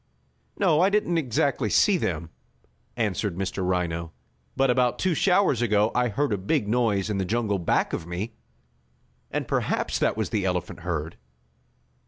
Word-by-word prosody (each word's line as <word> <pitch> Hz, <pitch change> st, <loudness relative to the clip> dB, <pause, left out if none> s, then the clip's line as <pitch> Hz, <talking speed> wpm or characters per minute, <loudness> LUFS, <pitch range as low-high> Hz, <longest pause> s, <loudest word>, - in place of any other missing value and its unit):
"No, 170 Hz, -6 st, +3 dB
I 190 Hz, -, +5 dB
didn't 200 Hz, -5 st, +1 dB
exactly 135 Hz, -3 st, 0 dB
see 200 Hz, -, +4 dB
them," 85 Hz, -, -2 dB, 0.7 s
answered 105 Hz, -4 st, -1 dB
Mr. 95 Hz, 0 st, -3 dB
Rhino, 85 Hz, -2 st, -1 dB, 0.5 s
"but 135 Hz, -1 st, +3 dB
about 125 Hz, -1 st, +2 dB
two 185 Hz, -2 st, +1 dB
showers 180 Hz, -, +3 dB
ago 105 Hz, -2 st, +2 dB
I 125 Hz, 0 st, +2 dB
heard 120 Hz, +3 st, 0 dB
a 100 Hz, -, -1 dB
big 105 Hz, +4 st, 0 dB
noise 110 Hz, -4 st, +1 dB
in 100 Hz, -, -1 dB
the -, -, +1 dB
jungle 105 Hz, 0 st, 0 dB
back 85 Hz, -, 0 dB
of 80 Hz, -, -4 dB
me, 95 Hz, +6 st, -4 dB, 1.0 s
and -, -, -3 dB
perhaps -, -, -1 dB
that -, -, +1 dB
was 110 Hz, -, -2 dB
the 105 Hz, -4 st, 0 dB
elephant 90 Hz, -2 st, -2 dB
herd." 80 Hz, -2 st, -4 dB
110 Hz, 160 wpm, -25 LUFS, 90-135 Hz, 1.0 s, I